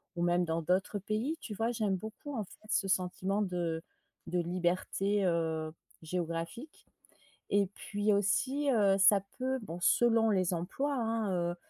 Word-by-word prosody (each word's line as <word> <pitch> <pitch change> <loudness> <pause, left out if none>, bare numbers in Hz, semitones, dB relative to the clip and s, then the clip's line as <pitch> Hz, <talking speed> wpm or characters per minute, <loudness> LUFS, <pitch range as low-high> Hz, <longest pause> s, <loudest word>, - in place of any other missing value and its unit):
ou 175 - -1
même 175 0 +3
dans 165 0 -1
d'autres 185 +5 +1
pays 215 - -2
tu 215 - -6
vois? 225 +3 0
J'aime 215 -5 0
beaucoup 220 +8 -7
en 220 - -1
fait 215 +3 -12
ce 200 -2 +1
sentiment 190 +2 0
de 170 -3 -2 0.4
de 180 +1 -1
liberté, 185 +3 0
heu, 160 -3 0 0.3
géographique. 170 - -5 0.6
Et 200 -1 +3
puis 205 0 0
aussi, 260 +9 +1
heu, 200 -5 +4
ça 200 +1 +6 0.2
peut, 260 0 -1
bon 175 -5 -6
selon 225 +3 +4
les 185 -2 +2
emplois 270 +12 -2
hein, 225 -4 0 0.2
heu, - - -6
195 Hz, 155 wpm, -32 LUFS, 175-220 Hz, 0.6 s, ça